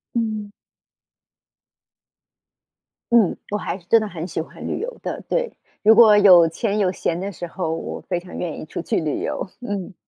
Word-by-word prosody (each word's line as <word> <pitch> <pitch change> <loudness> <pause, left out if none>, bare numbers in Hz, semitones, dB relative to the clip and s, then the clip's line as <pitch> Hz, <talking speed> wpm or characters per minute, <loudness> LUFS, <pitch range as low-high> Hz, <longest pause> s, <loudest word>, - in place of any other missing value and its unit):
嗯。 215 -3 -2 2.6
嗯， 225 -7 +4
我 210 - 0
还 200 - -4
真 205 +5 +3
的 215 - -3
很 170 -4 -6
喜 160 - -3
欢 160 - -9
旅 - - -2
游 480 +1 -5
的， - - -5
对， - - -1 0.3
如 220 +2 +6
果 215 -2 +8
有 180 -5 +8
钱 205 +5 -2
有 195 -3 +2
闲 170 -2 -2
的 195 +2 -4
时 175 -1 -7
候， 165 -2 -3
我 165 - -5
非 175 -2 -3
常 180 0 -10
愿 170 -4 -4
意 - - -7
出 155 - -5
去 - - -1
旅 155 -2 -2
游， - - -3
嗯。 205 -4 -5
195 Hz, 190 characters per minute, -22 LUFS, 175-215 Hz, 2.6 s, 果